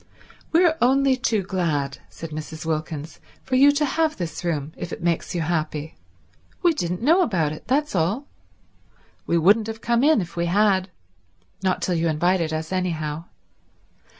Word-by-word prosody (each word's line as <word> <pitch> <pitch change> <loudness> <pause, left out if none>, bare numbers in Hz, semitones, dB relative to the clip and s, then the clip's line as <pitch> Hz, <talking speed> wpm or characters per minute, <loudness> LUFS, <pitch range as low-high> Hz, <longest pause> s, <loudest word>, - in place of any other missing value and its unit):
"We're 330 -1 +4
only 270 +2 +4
too 230 -6 0
glad," 160 -8 -1
said 165 -1 -9
Mrs. 155 +1 -7
Wilkins, 155 -1 -4 0.2
"for 260 - -1
you 280 +2 +7
to 300 +1 +1
have 315 +2 0
this 175 0 -5
room 155 -3 -2
if - - -6
it - - -6
makes 170 +1 -1
you 170 - 0
happy. 155 -1 -2 0.7
We 345 -2 +5
didn't 180 - -3
know 330 +8 +5
about 170 - +1
it, 155 - -9
that's 290 +5 +1
all. 190 - 0 1.0
We 170 - +2
wouldn't 205 +6 +4
have 225 0 -6
come 235 +1 +1
in 310 -3 +5
if 175 -4 -5
we 170 0 0
had—not 180 - -2
till 180 - 0
you 165 0 +1
invited 165 +1 +1
us, 155 +1 -4
anyhow. 165 -4 -2
175 Hz, 160 wpm, -23 LUFS, 155-235 Hz, 1.0 s, you